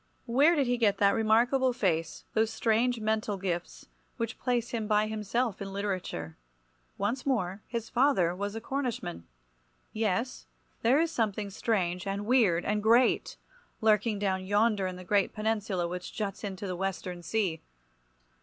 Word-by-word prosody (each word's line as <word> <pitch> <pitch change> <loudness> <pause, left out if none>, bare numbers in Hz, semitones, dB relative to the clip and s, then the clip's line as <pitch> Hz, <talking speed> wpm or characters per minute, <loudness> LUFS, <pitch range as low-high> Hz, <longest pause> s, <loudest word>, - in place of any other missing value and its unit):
Where 280 +8 +4
did 285 -3 +2
he 245 0 +1
get 210 -4 +3
that 200 -1 +4
remarkable 240 +4 +3
face, 165 -8 -1
those 220 0 +2
strange 235 +2 +1
mental 215 -1 -1
gifts, 175 -2 -4 0.3
which 230 -1 -3
place 240 -2 -1
him 225 -3 -2
by 210 0 +3
himself 215 +1 -2
in 195 0 -5
literature? 185 - -3 0.6
Once 230 +6 -1
more, 205 -8 -1
his 230 -1 -4
father 240 -10 +3
was 200 +2 -4
a - - -3
Cornishman. 245 - -3 0.7
Yes, 220 +3 -1 0.3
there 250 +6 +4
is 330 0 +1
something 210 -4 -1
strange, 185 -4 -1
and 200 +1 -2
weird, 210 -8 +3
and 210 0 0
great, 230 +4 +3 0.4
lurking 215 0 +3
down 190 -2 -1
yonder 205 0 +2
in 185 - -5
the 185 - -9
great 200 +2 +1
peninsula 210 -4 -1
which 180 +1 -6
juts 205 -1 -4
into 195 -1 -5
the 185 -2 -3
western 185 -1 -4
sea. 175 -2 -1
210 Hz, 155 wpm, -29 LUFS, 190-230 Hz, 0.7 s, Where